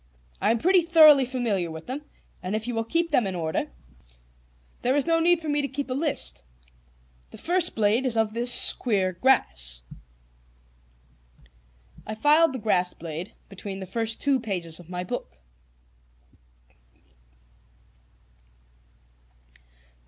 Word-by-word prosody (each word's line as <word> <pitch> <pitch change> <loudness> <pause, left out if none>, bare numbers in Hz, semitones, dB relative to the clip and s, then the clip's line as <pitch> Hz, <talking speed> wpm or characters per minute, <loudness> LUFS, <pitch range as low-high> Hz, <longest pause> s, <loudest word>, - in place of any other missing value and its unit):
I 205 - +2
am 230 - +2
pretty 365 +8 +3
thoroughly 310 -5 +6
familiar 230 -9 -2
with 160 0 -9
them, 265 +4 -5 0.4
and 185 +3 -3
if 220 +1 -4
you 245 - -3
will 225 0 -1
keep 335 +8 -1
them 230 - +2
in 190 - -4
order, 160 -2 -2 1.1
there 255 +2 +1
is 290 - +1
no 330 0 +2
need 345 +1 +3
for 320 - -8
me 290 0 0
to 280 - -2
keep 275 -1 -5
a - - +1
list. 290 - -2 0.9
The - - -12
first 355 0 0
is - - +2
a - - -24
blade 225 +3 +2
of 220 -1 +1
this 240 +1 +5
queer 195 -6 -1
grass." 60 - 0 2.2
I 215 - -4
filed 295 +6 +4
the - - -3
grass 185 -5 0
blade 165 +4 -7
between 195 0 -8
the 190 - -6
first 225 +4 -1
two 280 -2 +1
pages 180 -8 -4
of 175 -1 -15
my 180 0 -4
book. 245 - -6
230 Hz, 140 wpm, -25 LUFS, 190-285 Hz, 2.2 s, thoroughly